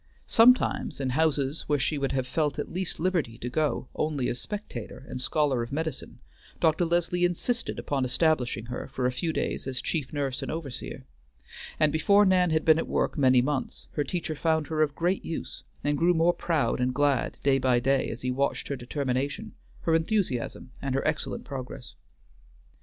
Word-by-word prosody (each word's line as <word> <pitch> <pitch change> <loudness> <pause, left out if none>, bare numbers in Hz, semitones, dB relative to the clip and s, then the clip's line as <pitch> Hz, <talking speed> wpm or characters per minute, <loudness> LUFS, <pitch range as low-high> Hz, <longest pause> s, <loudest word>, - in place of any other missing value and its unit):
Sometimes 245 - +4
in 130 -2 -1
houses 145 0 +1
where 145 - +2
she 145 +2 0
would 135 -1 0
have 130 -2 0
felt 145 +2 -1
at 145 - -4
least 185 0 -2
liberty 165 -10 0
to 120 +2 -5
go 145 -3 0
only 150 -5 -1
as 120 - -3
spectator 140 - -6
and 125 - -4
scholar 140 -3 +2
of 115 - -5
medicine, 160 +2 -4 0.4
Dr. 160 +1 +3
Leslie 175 +1 +1
insisted 180 +7 0
upon 140 -2 -1
establishing 125 -4 +1
her 125 +1 -5
for 130 - -3
a 125 - +2
few 160 +7 -1
days 155 - -2
as 130 -1 -1
chief 150 -6 -2
nurse 140 -3 -2
and - - -4
overseer, 155 -6 -6 0.7
and 155 -1 +4
before 200 +6 +5
Nan 185 -2 +4
had 160 -1 +1
been 160 0 +6
at - - -2
work - - 0
many 130 -4 +4
months 140 -1 -2
her 145 - -1
teacher 170 0 -3
found 160 0 +1
her 155 -1 0
of 145 -2 +1
great 180 +3 0
use, 165 - -5 0.2
and 145 0 0
grew 175 +1 +4
more 165 +2 +4
proud 160 -7 0
and 125 0 0
glad 145 -2 +1
day 135 -1 +4
by 125 -2 +3
day 135 +2 +1
as 115 - -6
he 130 - 0
watched 140 +2 -1
her 140 - -1
determination, 140 - -3 0.3
her 165 - +1
enthusiasm, 165 - 0
and 135 -1 -2
her 135 - 0
excellent 135 - -2
progress. 130 - -7
145 Hz, 185 wpm, -27 LUFS, 130-165 Hz, 0.7 s, been